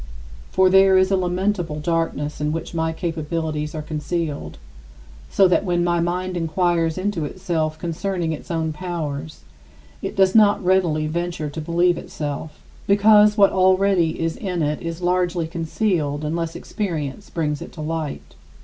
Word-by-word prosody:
For 190 - +4
there 190 0 +6
is 185 +1 +3
a - - +4
lamentable 180 -3 -1
darkness 155 -2 -2
in 150 0 0
which 165 +2 -4
my 160 -1 0
capabilities 160 -2 -3
are 155 - -4
concealed, 155 0 -3 0.7
so 195 - +5
that 180 - +2
when 175 -3 +1
my 175 0 +1
mind 180 +2 -1
inquires 165 0 0
into 185 -3 -1
itself 155 -1 -2
concerning 170 +1 -2
its 155 - -7
own 160 -2 -1
powers, 155 -3 -5 0.6
it - - -4
does 190 -1 +4
not 205 -3 +4
readily 175 -5 +2
venture 165 -1 -3
to 160 - -5
believe 175 +2 +2
itself, 150 +1 -6 0.2
because 210 +1 +5
what 200 -1 +6
already 185 -3 +3
is 165 0 -1
in 180 -5 -2
it 150 +1 -1
is 165 +1 -5
largely 175 -1 +1
concealed 160 -3 -1
unless 165 +1 -2
experience 170 -4 -4
brings 150 -3 -2
it - - -8
to 155 - -8
light. 155 -1 -4
170 Hz, 150 wpm, -22 LUFS, 155-185 Hz, 0.7 s, there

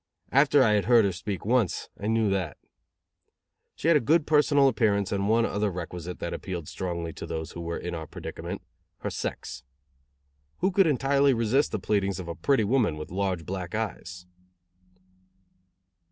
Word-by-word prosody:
After 140 0 +5
I 110 - +4
had 105 -1 +2
heard 115 -2 +5
her 100 - +1
speak 95 +1 -5
once, 115 -5 +1
I 100 - -3
knew 110 -1 +2
that. 90 -7 -2 1.2
She - - -3
had 165 - +6
a - - +6
good 155 +5 +2
personal 145 -2 +4
appearance 105 -5 +1
and 100 0 0
one 115 +1 +4
other 105 -1 0
requisite 90 -1 -6
that 85 - -4
appealed 85 -5 -5
strongly 85 -3 -4
to - - -8
those 80 -1 -4
who 85 - -7
were 85 0 -3
in 90 - -5
our 80 -2 -5
predicament - - -7 0.4
her - - -3
sex. 65 +1 -5 0.9
Who 190 +2 +1
could 190 -1 +4
entirely 140 -1 +3
resist 115 +5 +2
the - - -1
pleadings 100 -1 0
of 90 - -6
a 85 - -3
pretty 110 +9 +2
woman 105 - +1
with 75 - -7
large 95 -3 -1
black 90 +1 -4
eyes? 90 -5 -5
100 Hz, 170 wpm, -27 LUFS, 90-125 Hz, 1.2 s, had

